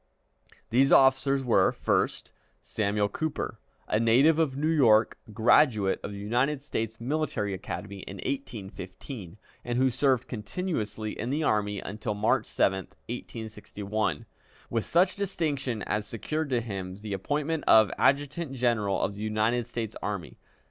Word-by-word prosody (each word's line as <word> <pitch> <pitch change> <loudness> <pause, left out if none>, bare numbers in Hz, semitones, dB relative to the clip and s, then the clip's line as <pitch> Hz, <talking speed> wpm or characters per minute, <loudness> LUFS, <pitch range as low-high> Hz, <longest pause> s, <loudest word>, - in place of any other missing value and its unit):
These 135 +4 +4
officers 135 0 +5
were 120 -3 +4
first, - - -1 0.3
Samuel 105 -1 0
Cooper, 155 +9 -3 0.3
a 105 - +1
native 130 +8 +5
of 140 -5 +1
New 150 - -1
York, 120 -9 +4
a - - -12
graduate 110 -2 +4
of - - -5
the 100 - -7
United 125 +8 0
States 110 -5 -3
Military 125 -6 -1
Academy 100 +1 -6
in 95 - -8
1815, 100 - -6 0.3
and 120 0 -2
who 130 0 +3
served 130 0 +1
continuously 110 - -3
in 115 - -4
the 150 +4 0
army 105 -6 0
until 105 +1 -4
March 105 +2 +1
7, 95 - +2 0.3
1861, 105 -6 -4 0.5
with 115 -2 0
such 180 +2 +3
distinction 145 - -2
as 105 0 -2
secured 155 +7 -3
to 125 -3 +1
him 95 -5 -5
the 105 +1 -6
appointment 145 +10 -1
of 110 -3 +7
Adjutant 145 +2 +1
General 115 -6 +1
of 100 - 0
the 100 - -9
United 110 +2 0
States 115 -3 -4
Army. 100 -5 -5
115 Hz, 140 wpm, -28 LUFS, 105-135 Hz, 0.5 s, of